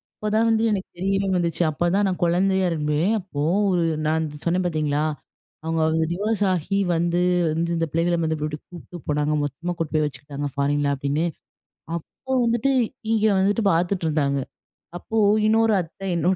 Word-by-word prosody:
அப்போதான் 215 +2 +1
வந்து 225 0 +2
எனக்கு 195 -2 -2
தெரியவே 195 +2 0
வந்துச்சு. 170 0 0
அப்பதான் 175 +6 +1
நான் 185 -2 -3
குழந்தையா 190 +2 +2
இரும்பேன். 150 +4 0
அப்போ 175 -7 -6 0.3
ஒரு 175 -2 +2 0.2
நான் 160 +1 +1 0.2
சொன்னேன் 180 +2 +1
பார்த்தீங்களா, 150 -3 0 0.6
அவங்க 165 0 -1
வந்து 160 0 +1
டிவோர்ஸ் 205 +2 -1
ஆகி 185 +3 -1 0.2
வந்து 170 +1 +1 0.3
வந்து 165 +2 -1
இந்த 165 - +1
பிள்ளைகளை 170 +1 +1
வந்து 160 -1 -1
வீட்டுக்கு 150 0 -4
கூப்பிட்டு 175 0 -10
போனாங்க, 150 0 0
மொத்தமா 165 +6 -3
கூட்டு 165 -2 -3
போய் 155 - +3
வச்சுக்கிட்டாங்க 145 +1 -5
ஃபாரின்ல 140 0 +1
அப்டின்னு. 140 +4 -1 0.7
அப்போ 265 +10 -8
வந்துட்டு, 235 +3 +1 0.4
இங்கே 220 -1 +3
வந்துட்டு, 205 +4 +2
பார்த்துட்டு 175 +2 0
இருந்தாங்க. 140 -3 +1 0.6
அப்போ 225 +5 -4 0.3
இன்னொரு 225 0 +3
அத்தை, 175 +4 -10
என்னோட 175 +3 +2
170 Hz, 155 wpm, -23 LUFS, 150-195 Hz, 0.7 s, போய்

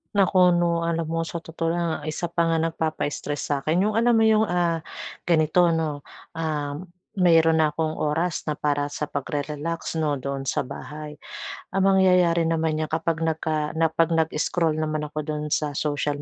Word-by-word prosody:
Naku, 185 -2 +5
'no, 170 -1 +1
alam 165 -1 -1
mo 165 +1 -1
sa 165 +1 -4
totoo 165 0 -3
lang, 170 0 0
ang - - -13
isa 155 - -3
pa 170 -1 +2
nga 165 - +2
nagpapa-stress 160 -2 -2
sa 140 - -1
'kin 165 +7 +1
yung 215 - 0
alam 235 +1 +3
mo 225 - +4
yung, 220 -1 +5
ah, 170 -2 +1 0.4
ganito, 170 +1 +3
'no. 160 -3 -1 0.3
Um, 155 +1 -3 0.3
mayro'n 165 -2 +5
na 155 - +5
akong 155 +1 -2
oras 160 +3 -1
na 150 - 0
para 145 -1 0
sa 145 - -5
pagre-relax, 150 +3 -3
'no, 150 -2 +1
doon 135 0 -4
sa - - 0
bahay. 150 +3 -8 0.5
Ang 195 0 +2
mangyayari 180 -3 +4
naman 160 -1 0
niyan 155 0 -1
kapag 165 0 0
nagka 155 -1 -1
na 165 0 +3
'pag 165 +1 +2
nag-scroll 160 0 +1
naman 155 -1 -1
ako 155 -1 -4
do'n 150 -1 -3
sa 150 0 0
social 145 0 -1
160 Hz, 180 wpm, -24 LUFS, 150-170 Hz, 0.5 s, Naku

